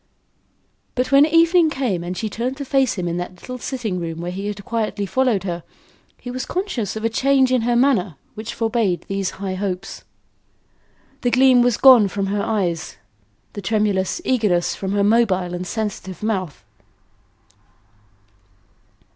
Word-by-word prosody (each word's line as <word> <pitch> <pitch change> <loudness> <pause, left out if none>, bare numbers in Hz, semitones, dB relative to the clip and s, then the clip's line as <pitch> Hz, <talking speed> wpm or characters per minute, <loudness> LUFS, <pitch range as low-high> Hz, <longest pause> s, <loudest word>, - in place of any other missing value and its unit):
But 255 +1 -1
when 280 +2 +6
evening 330 +1 +4
came 245 - -2
and 180 +1 -5
she 220 - -2
turned 240 +5 -3
to 280 - -5
face 265 -2 +2
him 180 -3 -3
in 170 0 -2
that 180 0 -6
little 250 0 -7
sitting 230 -8 -3
room 165 -1 -5
where 175 +1 -4
he 195 +3 -5
had 205 -1 -6
quietly 220 -3 -2
followed 240 -3 +1
her, 175 -2 -3 0.6
he 245 - -7
was 255 +1 -4
conscious 350 - -3
of 220 +1 -4
a - - +5
change 265 +3 +2
in 255 -2 +3
her 240 +1 +1
manner 235 - +2 0.2
which 215 +1 -7
forbade 225 -7 0
these 195 -1 -1
high 195 -1 -3
hopes. 185 0 -4 1.2
The 245 - +1
gleam 255 0 +5
was 245 -2 +2
gone 250 -6 +7
from 195 0 -2
her 205 - 0
eyes; 180 - -2 0.6
the 205 - -6
tremulous 205 - 0
eagerness 210 -9 +1
from 195 0 -4
her 205 0 +2
mobile 200 -5 +2
and 180 +1 -4
sensitive 205 -4 -5
mouth. 185 - -3
215 Hz, 160 wpm, -21 LUFS, 185-250 Hz, 1.2 s, gone